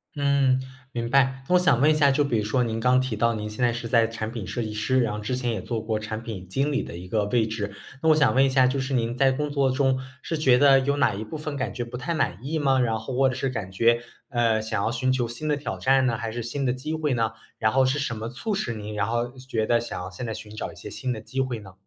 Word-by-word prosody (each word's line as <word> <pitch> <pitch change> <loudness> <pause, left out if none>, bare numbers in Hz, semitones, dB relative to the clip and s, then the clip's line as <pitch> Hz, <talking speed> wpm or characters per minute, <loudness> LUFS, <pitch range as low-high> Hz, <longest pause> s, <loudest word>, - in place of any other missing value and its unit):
嗯， 140 -2 +2 0.3
明 115 -2 -3
白。 130 0 +2
那 180 - +4
我 - - +6
想 180 -9 +3
问 150 - +6
一 - - +5
下， 145 -2 +5
就 145 +2 +2
比 125 -5 0
如 105 - 0
说 120 +4 +1
您 115 -1 -2
刚 125 +2 +4
提 130 -4 -2
到 115 +2 +2
您 105 -1 -4
现 110 +4 0
在 120 - +2
是 120 0 -4
在 115 0 +4
产 115 -1 -5
品 115 -5 -5
设 120 - -3
计 110 -2 -3
师， 110 +5 +1
然 115 -3 0
后 105 - -4
之 105 +4 -2
前 125 -1 -2
也 110 - -2
做 115 -2 -3
过 110 0 -1
产 110 +1 -5
品 105 -6 -7
经 135 +10 0
理 140 - 0
的 - - -8
一 90 +2 -8
个 105 +2 0
位 110 +1 +1
置。 105 -2 -4 0.3
那 - - +2
我 155 - +7
想 150 -4 +3
问 135 +1 +5
一 - - +2
下， 130 -1 +4
就 135 +2 0
是 135 +1 -3
您 120 -1 0
在 135 0 +4
工 150 +3 -2
作 140 -2 +2
中 130 0 +2 0.2
是 165 - -3
觉 130 -5 +4
得 135 -1 +7
有 140 +2 0
哪 105 - +2
一 105 - -4
部 110 - -8
分 150 -1 -3
感 130 - -2
觉 120 - -3
不 120 +1 -7
太 130 +7 -3
满 120 - 0
意 155 +4 -2
吗？ 135 -2 +3
然 115 -3 +1
后 125 +4 -6
或 135 +1 +4
者 130 - 0
是 135 - -1
感 110 -7 -5
觉， 115 +4 +3 0.3
呃， 115 -2 +2
想 110 -2 -2
要 110 - 0
寻 130 +1 0
求 125 -2 0
新 120 +7 -5
的 150 -1 +1
挑 145 - -5
战 135 0 +3
呢？ 120 -2 +1
还 115 0 -4
是 120 +1 -4
新 130 +5 -3
的 125 -2 +1
机 130 +5 -4
会 155 -4 0
呢？ 115 -1 +1 0.3
然 110 0 +2
后 135 +2 +4
是 130 +2 +1
什 140 -5 -2
么 110 +1 -5
促 210 - -1
使 120 - -2
您 105 0 -6
然 105 -1 -1
后 120 +1 -1
觉 120 -4 -2
得 120 +1 +3
想 120 - -5
要 90 +2 -6
现 120 +6 -6
在 110 - -3
寻 105 0 -9
找 - - -4
一 - - -15
些 - - -9
新 130 - -3
的 115 - -3
机 135 +4 -2
会 130 -3 -2
呢？ 95 -3 -12
125 Hz, 330 characters per minute, -25 LUFS, 110-135 Hz, 0.3 s, 我